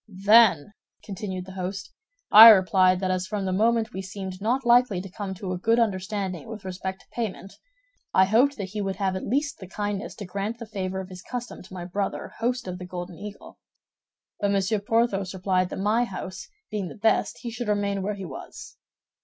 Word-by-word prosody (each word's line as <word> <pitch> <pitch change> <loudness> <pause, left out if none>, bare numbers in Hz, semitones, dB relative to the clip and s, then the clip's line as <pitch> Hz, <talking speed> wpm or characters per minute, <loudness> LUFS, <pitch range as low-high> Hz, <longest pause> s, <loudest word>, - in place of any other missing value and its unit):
"Then," 205 -5 +6 0.3
continued 190 -2 -5
the 190 - -10
host, 190 +1 -5 0.4
"I 225 +2 +12
replied 185 -2 +5
that 185 -1 0
as 185 0 -1
from 200 -1 -3
the 185 - -1
moment 225 +3 +1
we 190 - -4
seemed 190 -1 -7
not 245 +5 0
likely 240 -5 +4
to 190 0 -8
come 195 -1 -5
to 185 0 -5
a 180 - -3
good 225 +5 +2
understanding 195 -3 -1
with 215 -3 -8
respect 190 +1 -5
to - - -24
payment, 210 -4 -5 0.6
I 190 - +5
hoped 250 +8 +3
that 195 -3 -5
he 210 +2 -4
would 195 -1 -2
have 190 -2 -1
at 190 - -5
least 285 +5 -1
the 190 - -9
kindness 205 +3 -4
to 205 - -7
grant 200 +5 -4
the 230 - -7
favor 190 -3 -4
of 190 - -10
his 185 -1 -10
custom 245 +1 -6
to 185 - -14
my 175 -1 -6
brother 195 +2 -3
host 245 -1 -1
of 180 0 -5
the 180 - -7
Golden 180 0 -6
Eagle; 205 0 -10 0.8
but 205 - +1
Monsieur 200 +2 +1
Porthos 200 -3 0
replied 185 -1 0
that, - - -6
my 215 +5 +2
house 190 -2 -7 0.2
being 205 -3 -2
the - - -9
best, 220 +1 +1
he 235 - -4
should 240 0 -5
remain 200 -1 0
where 205 +2 -2
he 195 -1 -7
was. 140 -6 -10
195 Hz, 205 wpm, -25 LUFS, 185-220 Hz, 0.8 s, I